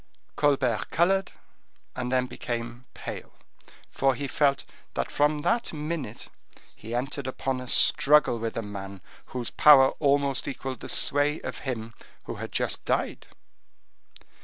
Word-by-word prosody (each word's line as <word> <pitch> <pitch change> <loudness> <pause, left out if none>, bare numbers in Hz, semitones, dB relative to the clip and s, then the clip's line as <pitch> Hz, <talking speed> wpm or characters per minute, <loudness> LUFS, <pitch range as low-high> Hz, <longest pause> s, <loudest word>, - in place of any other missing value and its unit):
Colbert 130 -7 +1
colored, 190 +3 +2 0.6
and 125 -1 -3
then 130 -1 +2
became 120 0 -5
pale, - - -8 0.6
for 135 -1 +2
he 140 +1 -4
felt 140 +1 +2 0.3
that - - -2
from 150 0 +1
that 235 +1 +1
minute 150 -6 -5 0.5
he 115 +2 -6
entered 135 +2 -3
upon 130 0 -2
a 125 - -8
struggle 140 -2 +4
with 115 0 -4
a 115 - -2
man 100 -2 -8 0.3
whose 125 -2 -5
power 135 -3 +7
almost 140 -2 +1
equaled 130 0 -5
the - - -8
sway 145 +2 +2
of - - -6
him 115 -2 -4 0.3
who - - -7
had - - -6
just - - -1
died. - - -2
135 Hz, 135 wpm, -27 LUFS, 120-145 Hz, 0.6 s, power